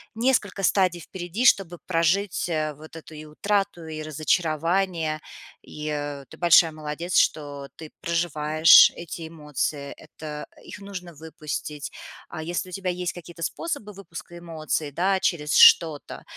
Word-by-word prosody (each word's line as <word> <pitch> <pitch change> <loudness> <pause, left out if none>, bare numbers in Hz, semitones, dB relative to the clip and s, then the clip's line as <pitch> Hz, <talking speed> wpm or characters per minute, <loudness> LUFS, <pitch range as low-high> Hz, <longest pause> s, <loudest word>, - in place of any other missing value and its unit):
несколько 225 -5 +1
стадий 185 -2 +2
впереди, 185 +8 -4
чтобы 180 -7 +4
прожить 180 +3 +1 0.3
вот 155 +1 -13
эту 160 0 -11
и 155 0 -9
утрату, 195 +2 -1
и 155 -1 -6
разочарование. 160 +2 0 0.4
И 150 0 -7 0.4
ты - - -13
большая 170 -1 +6
молодец, 155 +3 -3
что 145 -2 +1
ты 160 -2 -11
проживаешь 155 -2 +6
эти 165 -1 -7
эмоции. 150 -2 -4
Это 150 -1 -8 0.2
их - - -10
нужно 185 -4 -8
выпустить. 150 -1 -6 0.4
А 160 - -6
если 175 +2 -3
у - - -12
тебя 185 0 -3
есть 180 0 -3
какие-то 175 -1 -11
способы 285 - -4
выпуска 175 -2 -10
эмоций, 160 -3 -3
да, 190 +5 +1
через 150 -5 0
что-то, 160 -4 +5
165 Hz, 130 wpm, -25 LUFS, 155-185 Hz, 0.4 s, большая